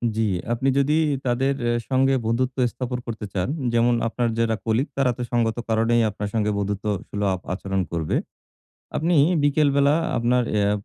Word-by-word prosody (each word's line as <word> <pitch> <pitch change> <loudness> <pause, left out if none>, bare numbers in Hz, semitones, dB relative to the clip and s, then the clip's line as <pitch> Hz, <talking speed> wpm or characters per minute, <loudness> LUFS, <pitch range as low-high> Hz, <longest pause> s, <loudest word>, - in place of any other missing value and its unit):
জি 110 - 0 0.3
আপনি 130 +3 0
যদি 140 +2 +3 0.3
তাদের 130 +3 +1
অ্যা 120 - +2 0.2
সঙ্গে 135 0 +3
বন্ধুত্ব 125 +3 0
স্থাপন 125 0 -4
করতে 110 -2 -5
চান, 90 +1 -1 0.3
যেমন 120 +1 +3
আপনার 120 +1 -1
যারা 115 -1 +2
কলিগ 115 +6 +1
তারা 130 -2 +3
তো - - -5
সঙ্গত 115 -1 +1
কারণেই 115 +1 +3
আপনার 105 0 -5
সঙ্গে 105 -2 +1
বন্ধুত্ব 100 +1 -3 0.2
সুলভ 100 -3 -1
আচরণ 95 0 -2
করবে। 80 -2 -1 0.8
আপনি 170 +3 +1 0.3
বিকেলবেলা 140 0 +3 0.2
আপনার 125 +1 +2
অ্যা 105 -1 +2
120 Hz, 155 wpm, -23 LUFS, 105-130 Hz, 0.8 s, যদি